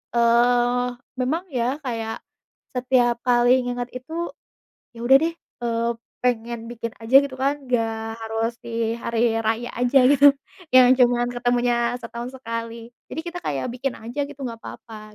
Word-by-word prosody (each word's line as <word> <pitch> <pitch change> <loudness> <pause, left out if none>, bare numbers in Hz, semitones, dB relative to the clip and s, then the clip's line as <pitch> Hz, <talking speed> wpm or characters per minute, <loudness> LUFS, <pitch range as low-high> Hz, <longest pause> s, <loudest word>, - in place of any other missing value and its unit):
eee, 240 +1 +3 0.4
memang 310 +8 0
ya 250 +2 0
kayak 225 -2 -3 0.6
setiap 250 -1 +2
kali 245 0 +4 0.2
inget 245 0 -3
itu, 255 +6 -12 0.8
ya 230 - -11
udah 265 +2 +8
deh, 330 +1 0 0.3
eee, 230 0 0 0.3
pengen 235 -1 -1
bikin 230 -1 -5
aja 225 +3 -4
gitu 275 - -6
kan, 275 +2 +1
nggak 230 -3 0 0.3
harus 225 +1 -2
di 230 -1 -1
hari 230 0 0
raya 225 +2 -1
aja 250 +2 +4
gitu, 285 0 +6 0.5
yang 255 0 +8
cuman 245 -1 +4
ketemunya 245 0 +1
setahun 235 +1 -6
sekali 230 -1 -6 0.2
jadi - - -4
kita 345 +1 -5
kayak 140 -2 -2
bikin 260 0 -2
aja 235 +6 -5
gitu 290 -1 -12
nggak 230 -2 -6
papa 215 -2 -10
240 Hz, 145 wpm, -23 LUFS, 230-250 Hz, 0.8 s, udah